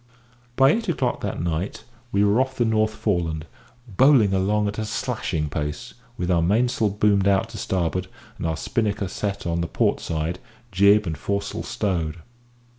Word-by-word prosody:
By 135 Hz, +1 st, +6 dB
eight 225 Hz, +2 st, -1 dB
o'clock 170 Hz, -, -1 dB
that -, -, -3 dB
night 85 Hz, +3 st, -3 dB, 0.3 s
we 100 Hz, -3 st, +3 dB
were 105 Hz, +4 st, +4 dB
off 130 Hz, 0 st, -2 dB
the 120 Hz, -, +1 dB
North 110 Hz, -1 st, +1 dB
Foreland, 85 Hz, -8 st, -1 dB, 0.4 s
bowling 115 Hz, -1 st, +4 dB
along 105 Hz, +2 st, +1 dB
at 105 Hz, +1 st, -4 dB
a 110 Hz, -, -2 dB
slashing 75 Hz, -6 st, -2 dB
pace, 75 Hz, -3 st, -4 dB, 0.2 s
with 90 Hz, +1 st, -1 dB
our 85 Hz, -2 st, +3 dB
mainsail 110 Hz, +4 st, +2 dB
boomed 100 Hz, -1 st, +2 dB
out 100 Hz, -1 st, +2 dB
to -, -, -8 dB
starboard, 90 Hz, 0 st, -1 dB, 0.3 s
and -, -, -2 dB
our 80 Hz, 0 st, -1 dB
spinnaker 105 Hz, -1 st, -1 dB
set 100 Hz, +2 st, -4 dB
on 85 Hz, 0 st, 0 dB
the 85 Hz, -, -1 dB
port -, -, +1 dB
side, 80 Hz, +2 st, -3 dB, 0.3 s
jib 100 Hz, +2 st, +5 dB
and 80 Hz, -4 st, -4 dB
foresail 100 Hz, 0 st, -2 dB
stowed. 85 Hz, -6 st, -2 dB
100 Hz, 170 wpm, -23 LUFS, 85-110 Hz, 0.4 s, By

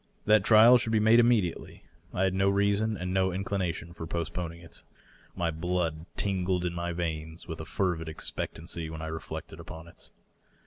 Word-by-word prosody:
That 105 Hz, -2 st, +5 dB
trial 115 Hz, +4 st, +8 dB
should 110 Hz, -, -2 dB
be 110 Hz, -, +3 dB
made 110 Hz, +2 st, +6 dB
immediately. 115 Hz, -8 st, +1 dB, 0.3 s
I 95 Hz, -, 0 dB
had 95 Hz, -1 st, +2 dB
no 95 Hz, +1 st, +2 dB
reason 100 Hz, +2 st, +1 dB
and 90 Hz, 0 st, -3 dB
no 95 Hz, 0 st, +2 dB
inclination 90 Hz, -3 st, -3 dB
for 80 Hz, -1 st, -7 dB
postponing 85 Hz, 0 st, -4 dB
it. 85 Hz, -2 st, -13 dB, 0.5 s
My 85 Hz, -1 st, 0 dB
blood 85 Hz, 0 st, -2 dB
tingled 95 Hz, -2 st, 0 dB
in 85 Hz, -, -1 dB
my 85 Hz, 0 st, -3 dB
veins 80 Hz, -1 st, -4 dB
with 80 Hz, -2 st, -6 dB
a -, -, -7 dB
fervid 85 Hz, -3 st, -1 dB
expectancy 80 Hz, +1 st, -5 dB
when 80 Hz, 0 st, -7 dB
I 80 Hz, 0 st, -4 dB
re 80 Hz, -, -4 dB
flected 80 Hz, 0 st, -8 dB
upon 80 Hz, +1 st, -9 dB
it. -, -, -14 dB
90 Hz, 180 wpm, -29 LUFS, 80-100 Hz, 0.5 s, trial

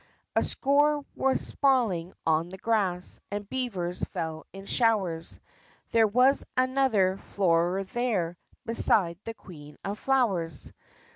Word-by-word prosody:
A -, -, +4 dB
score 290 Hz, +1 st, +2 dB
were 265 Hz, 0 st, +2 dB
sprawling 225 Hz, -11 st, +1 dB
on 160 Hz, +1 st, +2 dB
the 190 Hz, -, -9 dB
grass, 190 Hz, -5 st, 0 dB
And 205 Hz, 0 st, -4 dB
beavers 195 Hz, -8 st, -3 dB
fell 160 Hz, -1 st, -4 dB
in 195 Hz, 0 st, -10 dB
showers; 195 Hz, -9 st, 0 dB, 0.5 s
There 225 Hz, -1 st, +5 dB
was 250 Hz, +6 st, +4 dB
another 255 Hz, -8 st, +2 dB
Floorer 180 Hz, -1 st, +1 dB
there 195 Hz, -5 st, -1 dB, 0.3 s
Beside 195 Hz, -7 st, +2 dB
the 225 Hz, -, -5 dB
Queen 150 Hz, -7 st, -13 dB
of 200 Hz, +2 st, -4 dB
Flowers! 200 Hz, -, 0 dB
200 Hz, 120 wpm, -28 LUFS, 175-250 Hz, 0.5 s, There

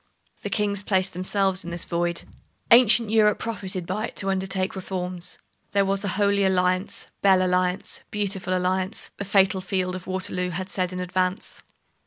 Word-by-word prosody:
The -, -, -4 dB
kings 205 Hz, -2 st, 0 dB
placed 190 Hz, -2 st, +1 dB
themselves 190 Hz, +1 st, 0 dB
in 170 Hz, -, -6 dB
this 170 Hz, 0 st, -4 dB
void. 170 Hz, 0 st, 0 dB, 0.5 s
Ancient 235 Hz, -2 st, +7 dB
Europe 215 Hz, -2 st, +4 dB
profited 190 Hz, -5 st, -4 dB
by 210 Hz, +6 st, -2 dB
it -, -, -13 dB
to 195 Hz, 0 st, 0 dB
undertake 190 Hz, 0 st, -1 dB
reforms. 180 Hz, -2 st, -3 dB, 0.4 s
There 200 Hz, -1 st, +3 dB
was 195 Hz, +1 st, 0 dB
a -, -, -2 dB
Holy 200 Hz, -1 st, +3 dB
Alliance; 185 Hz, 0 st, +1 dB
Belle 190 Hz, -2 st, +5 dB
Alliance, 180 Hz, 0 st, 0 dB
Beautiful 195 Hz, -3 st, -1 dB
Alliance, 185 Hz, +2 st, -2 dB
the 200 Hz, -, -4 dB
fatal 195 Hz, -1 st, +3 dB
field 185 Hz, -1 st, -1 dB
of 185 Hz, -, -8 dB
Waterloo 185 Hz, -1 st, -2 dB
had 185 Hz, +2 st, -4 dB
said 185 Hz, -2 st, -2 dB
in 185 Hz, -, -5 dB
advance. 185 Hz, +1 st, -2 dB
190 Hz, 165 wpm, -24 LUFS, 185-200 Hz, 0.5 s, Ancient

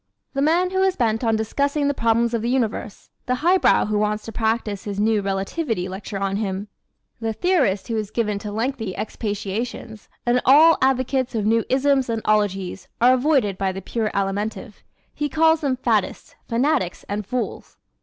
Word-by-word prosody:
The 275 Hz, -, -1 dB
man 345 Hz, +5 st, +2 dB
who 380 Hz, 0 st, +1 dB
is 380 Hz, -1 st, +2 dB
bent 225 Hz, -1 st, 0 dB
on 225 Hz, -1 st, +2 dB
discussing 280 Hz, +7 st, 0 dB
the 285 Hz, -, +1 dB
problems 230 Hz, -1 st, +1 dB
of 230 Hz, -, 0 dB
the 235 Hz, -, -1 dB
universe, 230 Hz, -5 st, -2 dB, 0.2 s
the 250 Hz, -, +1 dB
highbrow 370 Hz, +2 st, +4 dB
who 210 Hz, 0 st, 0 dB
wants 210 Hz, 0 st, -1 dB
to 225 Hz, -, -6 dB
practise 220 Hz, -3 st, -1 dB
his 200 Hz, -1 st, -4 dB
new 215 Hz, 0 st, +2 dB
relativity 195 Hz, -, -2 dB
lecture 195 Hz, +2 st, -6 dB
on 195 Hz, 0 st, -1 dB
him, 200 Hz, -1 st, -3 dB, 0.5 s
the 225 Hz, -1 st, -2 dB
theorist 260 Hz, -, +1 dB
who 230 Hz, -, -2 dB
is 215 Hz, -2 st, -3 dB
given 210 Hz, -2 st, -1 dB
to 210 Hz, 0 st, -6 dB
lengthy 225 Hz, -2 st, -3 dB
expatiations, 215 Hz, +1 st, -4 dB, 0.2 s
and 245 Hz, +1 st, +2 dB
all 310 Hz, +5 st, +6 dB
advocates 260 Hz, -1 st, +1 dB
of 215 Hz, -2 st, 0 dB
new 225 Hz, +1 st, +3 dB
isms 270 Hz, -1 st, +2 dB
and 225 Hz, -1 st, -2 dB
ologies 195 Hz, -3 st, 0 dB
are 245 Hz, +2 st, +6 dB
avoided 255 Hz, -7 st, +1 dB
by 195 Hz, -1 st, 0 dB
the 190 Hz, -, -6 dB
pure 215 Hz, +3 st, -2 dB
Alimentive. 205 Hz, +3 st, -3 dB, 0.3 s
He 295 Hz, 0 st, -2 dB
calls 320 Hz, +2 st, +3 dB
them 270 Hz, -4 st, 0 dB
faddists, 260 Hz, -, -1 dB
fanatics 245 Hz, -, 0 dB
and 205 Hz, +1 st, -3 dB
fools. 245 Hz, +5 st, -4 dB
225 Hz, 175 wpm, -22 LUFS, 205-265 Hz, 0.5 s, all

